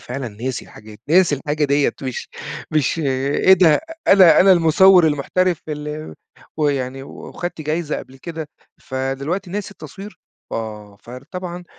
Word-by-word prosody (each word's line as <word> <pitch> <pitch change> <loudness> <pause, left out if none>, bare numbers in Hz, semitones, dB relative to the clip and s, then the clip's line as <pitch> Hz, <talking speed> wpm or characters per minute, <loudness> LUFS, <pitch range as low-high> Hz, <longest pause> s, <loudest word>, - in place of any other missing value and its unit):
فعلًا 125 0 -5
ناسي 120 +4 -5
الحاجات، 105 -1 -14
ناسي 170 -1 +4
الحاجة 145 +2 -2
ديَّة، 140 0 +2
مش 130 -2 -5 0.4
مش 155 +1 +1
إيه 140 +5 +2
ده؟ 170 -4 +5 0.3
أنا 190 -4 +7
أنا 190 +1 +7
المُصَوِّر 175 +1 +6
المحترف 165 +4 0
ال 150 +1 -6 0.4
ويعني 135 -3 -1
و - - -11 0.2
واخدت 175 -2 -6
جايزة 155 +1 -2
قبل 130 - -12
كده، 160 -1 -7 0.3
فدلوقتي 140 +8 -3
ناسي 205 +1 -4
التصوير! 195 +4 -11 0.3
آه، 105 -2 -6
فار 125 +2 -11
طبعًا 180 -1 -6
150 Hz, 135 wpm, -20 LUFS, 135-175 Hz, 0.4 s, أنا